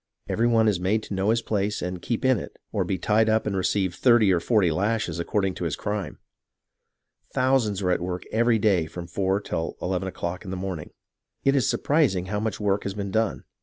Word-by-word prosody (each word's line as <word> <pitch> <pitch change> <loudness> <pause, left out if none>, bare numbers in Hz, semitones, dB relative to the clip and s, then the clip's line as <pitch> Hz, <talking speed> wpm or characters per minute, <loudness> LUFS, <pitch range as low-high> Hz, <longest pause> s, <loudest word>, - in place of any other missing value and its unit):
Every 115 +2 +1
one 115 -2 +4
is 100 -5 +2
made 105 +5 0
to - - -6
know 95 +2 0
his 115 +1 +2
place 105 -1 -1
and 90 0 -4
keep 120 +6 -2
in 130 -4 +4
it, - - -9
or - - 0
be 95 - -2
tied 110 +3 +2
up 110 0 +2
and 105 -2 -1
receive 95 -1 0
thirty 115 -3 +4
or 90 - +2
forty 95 -1 +2
lashes 105 +2 -1
according 95 +2 0
to 90 - -4
his 80 - -1
crime. 105 -2 -4 1.2
Thousands 125 -7 +2
are 90 - +2
at 90 - +1
work 90 0 -3
every 115 +1 +3
day 100 -7 +2
from 85 +2 -7
four 95 +3 0
till 80 -5 -4
eleven 95 +1 -2
o'clock 90 -1 -4
in 95 - -8
the 95 - -3
morning. 90 -4 -5 0.5
It 135 0 +3
is 130 -5 +2
surprising 130 - +2
how 105 +2 -2
much 110 -1 -2
work 100 -1 +1
has 100 0 -4
been 100 -2 -4
done. 110 0 0
100 Hz, 215 wpm, -25 LUFS, 90-110 Hz, 1.2 s, one